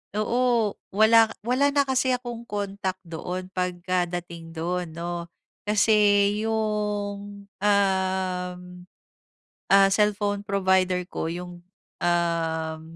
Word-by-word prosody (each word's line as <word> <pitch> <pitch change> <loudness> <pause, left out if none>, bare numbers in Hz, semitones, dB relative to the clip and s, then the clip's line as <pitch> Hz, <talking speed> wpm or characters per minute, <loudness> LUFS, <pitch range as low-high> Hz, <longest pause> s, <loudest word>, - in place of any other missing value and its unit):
oo, 235 0 +1 0.2
wala 225 +2 +6 0.2
wala 255 +5 +2
na 285 0 +3
kasi 260 -1 +1
akong 240 -2 -7
contact 195 -2 -4
doon, 180 +2 -6
pagkadating 175 -2 -3
do'n, 170 0 -3
'no. 170 0 -4 0.4
Kasi 205 -1 +4 0.2
yung, 205 -2 -2
uhm, 190 -2 0 1.1
ah, 195 0 +7
cellphone 205 0 +1
provider 190 -2 +2
ko - - -3
yung, 175 0 -7 0.4
uhm, 165 -2 -1
195 Hz, 95 wpm, -25 LUFS, 175-210 Hz, 1.1 s, ah